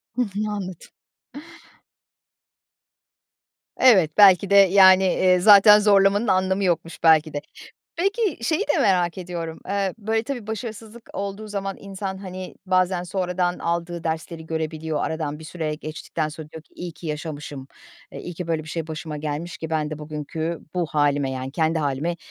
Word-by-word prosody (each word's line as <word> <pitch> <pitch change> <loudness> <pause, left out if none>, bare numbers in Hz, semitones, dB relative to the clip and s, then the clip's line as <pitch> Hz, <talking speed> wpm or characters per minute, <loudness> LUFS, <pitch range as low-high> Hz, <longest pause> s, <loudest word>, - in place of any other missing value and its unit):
Hı 250 - 0
hı. 210 -1 -2
Anladım 185 -4 -6 2.9
Evet, 190 -12 +5
belki 200 -1 +6
de, 200 - +3
yani, 190 -1 +7
eee, 185 -1 +3
zaten 210 +2 +8
zorlamanın 205 +1 +3
anlamı 190 0 +1
yokmuş 170 -2 -2
belki 160 -1 +5
de. 145 - -3 0.6
Peki 390 - -1
şeyi 315 +5 +1
de 295 - +1
merak 180 -2 +2
ediyorum, 170 -3 -6
eee, 195 -1 -1
böyle, 220 +1 -1
tabii, 245 -3 -6
başarısızlık 220 +1 -7
olduğu 200 +2 -5
zaman 195 -1 -4
insan, 195 -1 -6
hani, 185 -1 -8
bazen 185 -1 +1
sonradan 180 -1 -2
aldığı 170 0 -3
dersleri 160 0 -4
görebiliyor, 160 -1 -3
aradan 155 -2 -3
bir 160 - -11
süre 155 -2 -4
geçtikten 155 +1 -5
sonra 155 0 -10
diyor 160 -1 -10
ki - - -34
iyi 175 -1 -7
yaşamışım, 150 -3 -6 0.4
eee, - - -7
iyi 175 - -7
ki 180 0 -6
böyle 160 -2 -1
bir 155 - -13
şey 165 0 -4
başıma 155 -1 -6
gelmiş 150 +3 -5
ki 160 - -6
ben 155 -1 -1
de 155 - -6
bugünkü 155 +2 -5
bu 175 -2 0
hâlime, 145 -2 +1
yani, 130 0 -5
kendi 160 +1 +1
hâlime 150 +3 -2
175 Hz, 155 wpm, -23 LUFS, 160-195 Hz, 2.9 s, zaten